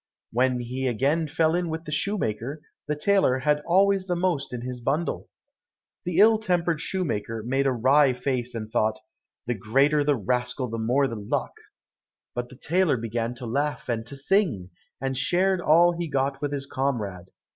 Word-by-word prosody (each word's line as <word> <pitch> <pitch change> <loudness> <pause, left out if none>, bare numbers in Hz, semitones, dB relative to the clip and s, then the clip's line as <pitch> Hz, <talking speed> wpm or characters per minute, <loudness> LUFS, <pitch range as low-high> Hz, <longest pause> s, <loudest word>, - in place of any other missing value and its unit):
When 125 +1 +1
he 130 +2 -3
again 140 +7 +1
fell 160 +2 +1
in 175 -1 0
with 160 +1 -5
the 150 - -6
shoemaker, 150 - -2 0.2
the 150 - 0
tailor 170 -4 +3
had 150 +2 +1
always 195 +2 +3
the 180 - 0
most 170 -6 -1
in 125 -1 -5
his 125 0 -6
bundle. 145 +7 -2 0.8
The 175 -1 -2
ill 215 +2 +6
tempered 175 -6 0
shoemaker 115 - -2
made 135 +4 +1
a - - +3
wry 130 +3 +4
face, 125 -1 -2
and 110 -1 -5
thought, 110 0 +1 0.5
"The 120 - 0
greater 135 +8 +2
the 145 0 +2
rascal 125 +4 -1
the 115 - -3
more 125 +5 +2
the 115 - -5
luck," 100 -1 -2 0.8
but 120 0 -4
the - - -13
tailor 170 -1 +1
began 115 +1 -3
to 120 - -7
laugh 140 +5 -2
and 115 -2 -1
to 140 - -8
sing, 135 - 0 0.3
and 135 0 -2
shared 180 +7 +2
all 170 +2 +5
he 170 0 -3
got 135 -1 -1
with 145 -1 -2
his 140 -1 -3
comrade. 110 -11 -3
135 Hz, 180 wpm, -25 LUFS, 120-165 Hz, 0.8 s, ill